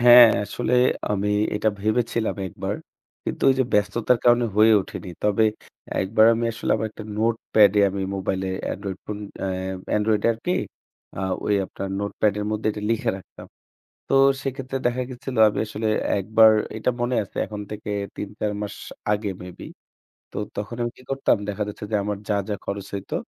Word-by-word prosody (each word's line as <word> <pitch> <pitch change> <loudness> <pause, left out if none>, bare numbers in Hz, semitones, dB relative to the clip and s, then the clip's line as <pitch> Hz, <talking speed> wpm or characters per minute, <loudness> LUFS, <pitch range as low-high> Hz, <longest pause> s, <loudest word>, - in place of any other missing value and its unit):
হ্যাঁ, 120 -1 +10 0.2
আসলে 120 +4 -1 0.4
আমি 105 0 0 0.3
এটা 105 +1 +2
ভেবেছিলাম 110 +1 0
একবার। - - -4 0.5
কিন্তু - - -4
ওই 130 - +4
যে - - +4
ব্যস্ততার 105 +4 +2
কারণে 120 0 +5
হয়ে 110 +1 +7
ওঠেনি। 95 - -7
তবে 105 +1 +3 0.6
একবার 110 +3 +4
আমি 115 - -1
আসলে 115 - -4
আমার 110 - -1
একটা 110 - -10
নোটপ্যাডে 110 -2 +4
আমি 100 0 -3
মোবাইলে 95 0 -2 0.2
এন্ড্রয়েড 95 -1 -5
ফোন 105 -1 -4 0.2
অ্যা - - -1 0.5
এন্ড্রয়েডে 105 0 +1
আরকি 115 +10 -3 0.7
আ - - -2 0.3
ওই 105 - +3
আপনার 100 - -6
নোটপ্যাডের 105 0 0
মধ্যে 110 0 -2
এটা 105 - -7
লিখে 115 - +1
রাখতাম। 95 - -13 0.6
তো - - -1 0.3
সেক্ষেত্রে 135 0 -3
দেখা 125 +1 -1
গেছিল 125 +1 -6
আমি - - -3
আসলে 110 +1 -3 0.3
একবার 110 +3 +6 0.3
এটা 110 - 0
মনে 120 +1 0
আছে - - -12
এখন 105 -1 -6
থেকে 105 0 -6 0.3
৩-৪ 105 +1 -3
মাস 105 - -4 0.4
আগে 105 -1 0
মে 90 - -7
বি। - - -7 0.7
তো - - -10 0.2
তখন 105 +3 -4
আমি 120 - -1
কি - - -16
করতাম 135 -3 +2
দেখা 105 +1 -2
যাচ্ছে, 105 - -7
যে 110 - +2
আমার 105 -1 -2
যা, 105 - +2
যা, 105 - 0
খরচ 100 0 -4
হইতো 100 - -5
105 Hz, 170 wpm, -24 LUFS, 100-115 Hz, 0.7 s, হ্যাঁ